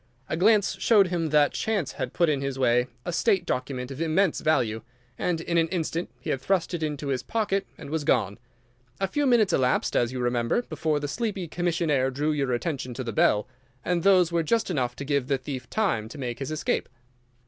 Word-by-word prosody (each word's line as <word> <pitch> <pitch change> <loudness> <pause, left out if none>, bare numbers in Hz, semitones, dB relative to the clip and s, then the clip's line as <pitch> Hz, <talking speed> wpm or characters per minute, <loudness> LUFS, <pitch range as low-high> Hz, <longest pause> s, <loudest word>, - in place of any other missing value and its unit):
A - - 0
glance 205 +3 +3
showed 205 -5 +4
him 170 -3 -1
that 150 -1 +4
chance 205 -9 -1
had 130 - -4
put 170 - +2
in 145 -3 +1
his 140 -1 -3
way 125 -1 +3 0.2
a 175 - -3
State 190 -1 +2
document 130 -1 -3
of 135 +3 -6
immense 165 +2 +2
value, 120 -8 +1 0.3
and 175 -2 -1
in 170 0 +1
an 165 - +2
instant 170 -1 -2
he - - -4
had 135 - -2
thrust 185 +3 0
it 170 - -2
into 150 -2 -3
his 130 -2 0
pocket 205 -3 -1
and 140 - -9
was 160 -1 -1
gone. 100 -7 +1 0.6
A 195 - +1
few 290 +8 0
minutes 220 -7 +4
elapsed, 125 -1 +1
as 120 0 +2
you 130 - -4
remember, 120 - 0
before 155 -9 -1
the 145 - -3
sleepy 205 0 -3
commissionnaire 160 -5 0
drew 145 +4 -1
your 140 -4 0
attention 130 -1 -3
to 130 - -4
the 115 -2 -4
bell, 105 0 +3 0.4
and 175 -1 +1
those 185 -2 +4
were 170 0 +2
just 225 +5 0
enough 125 -6 -1
to 140 - -6
give 140 -2 0
the 135 -1 +1
thief 130 -2 -7
time 120 - 0
to 150 - -10
make 125 -3 -4
his 135 - -4
escape. 155 -1 -1
155 Hz, 215 wpm, -26 LUFS, 130-180 Hz, 0.6 s, showed